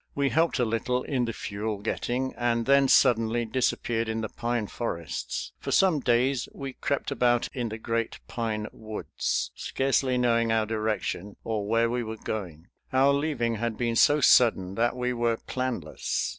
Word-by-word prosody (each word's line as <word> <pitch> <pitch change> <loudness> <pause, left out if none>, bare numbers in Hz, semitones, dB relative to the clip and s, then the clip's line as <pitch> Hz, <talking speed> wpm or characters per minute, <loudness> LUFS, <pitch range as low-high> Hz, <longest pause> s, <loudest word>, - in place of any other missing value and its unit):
We 140 -1 +1
helped 165 +3 +2
a 125 - +2
little 120 +3 -1
in 130 -4 0
the 115 - -2
fuel 105 0 -4
getting, 120 +5 -2
and 120 -1 0
then 140 0 +5
suddenly 120 -3 +4
disappeared 115 -1 0
in 110 0 -2
the 110 - -3
pine 120 -2 -2
forests. 85 -7 -4
For - - -6
some 185 -6 +4
days 125 +1 +1
we 135 -1 -6
crept 140 - -2
about 120 -1 +2
in 120 -3 -2
the 110 - -5
great 115 0 -2
pine 110 -2 -2
woods, 110 -1 -3
scarcely 135 -1 0
knowing 115 -2 +2
our 110 -1 +2
direction 110 -3 -2
or 105 -3 -2
where 115 +2 +3
we 120 +1 -1
were 110 -1 -5
going. 90 -6 -6 0.2
Our 135 +2 +4
leaving 140 -6 0
had 115 0 -2
been 120 -1 0
so 145 +5 +5
sudden 105 -8 +5
that 120 +4 +1
we 125 0 -1
were 115 -1 +1
planless. 125 -14 -3
115 Hz, 170 wpm, -27 LUFS, 110-125 Hz, 0.2 s, then